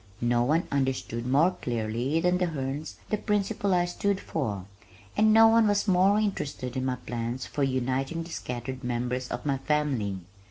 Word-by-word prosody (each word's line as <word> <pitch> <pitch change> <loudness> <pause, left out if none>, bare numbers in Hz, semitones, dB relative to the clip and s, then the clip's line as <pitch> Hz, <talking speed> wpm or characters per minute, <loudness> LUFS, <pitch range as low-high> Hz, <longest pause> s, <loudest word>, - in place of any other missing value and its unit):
No 120 0 +2
one 155 +7 +1
understood 130 -3 -1
more 145 +8 +4
clearly 120 +5 -1
than 180 +1 +2
the 180 - +2
Hernes 145 -1 -4 0.2
the 215 - +2
principles 205 -2 0
I 175 -1 +3
stood 195 +2 -1
for, 105 - -3 0.5
and 215 0 +4
no 225 +1 +8
one 225 -1 +5
was 205 +1 +1
more 190 +2 +4
interested 145 - -2
in 130 0 -1
my 130 -1 0
plans 120 0 -4
for 145 - -4
uniting 135 +4 0
the 165 - -10
scattered 125 0 -5
members 125 +1 -2
of 120 - -5
my 140 -2 0
family. 135 -10 0
135 Hz, 170 wpm, -27 LUFS, 125-180 Hz, 0.5 s, no